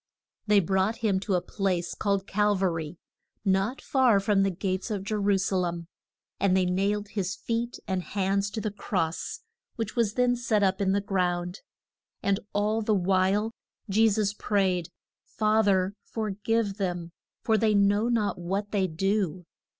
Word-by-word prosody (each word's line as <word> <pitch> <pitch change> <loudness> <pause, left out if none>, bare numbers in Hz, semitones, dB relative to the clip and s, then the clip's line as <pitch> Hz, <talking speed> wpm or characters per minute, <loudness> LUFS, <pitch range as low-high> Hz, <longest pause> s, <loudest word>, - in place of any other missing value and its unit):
They 210 -1 +6
brought 190 +3 +1
him 195 -3 +2
to 195 0 -1
a 180 - 0
place 180 -3 -1
called 200 -2 0
Cal 210 +1 +2
va 190 -1 +1
ry, 160 0 -5 0.5
not 195 +6 +1
far 255 -7 +4
from 200 0 +2
the 195 - +3
gates 190 +3 -2
of 205 -3 -2
Je 200 - -4
ru 205 -1 +2
sa 190 0 0
lem. 175 -2 -2 0.5
And 190 -1 +3
they 185 - +3
nailed 200 +3 0
his 195 -2 -2
feet 235 +1 -3
and 190 -1 -1
hands 195 +1 0
to 220 +1 -4
the 215 - -2
cross, 180 -5 -3 0.3
which 225 -2 -4
was 225 -4 +1
then 250 -1 +3
set 230 -4 +1
up 190 0 +1
in 190 -1 +2
the 200 - +1
ground. 180 -1 -1 0.6
And 200 0 +2
all 210 +2 +1
the 215 -1 +1
while 195 +3 +2 0.4
Je 220 +3 +5
sus 205 -1 0
prayed, 190 -5 0 0.3
Fa 215 0 +2
ther 190 -1 +2
for 220 -2 -3
give 210 0 -1
them, 175 -3 -3 0.3
for 220 - +3
they 215 0 +3
know 205 +3 +3
not 215 -6 0
what 195 +4 -3
they 195 -3 +1
do. 185 0 -1
200 Hz, 175 wpm, -27 LUFS, 185-210 Hz, 0.6 s, They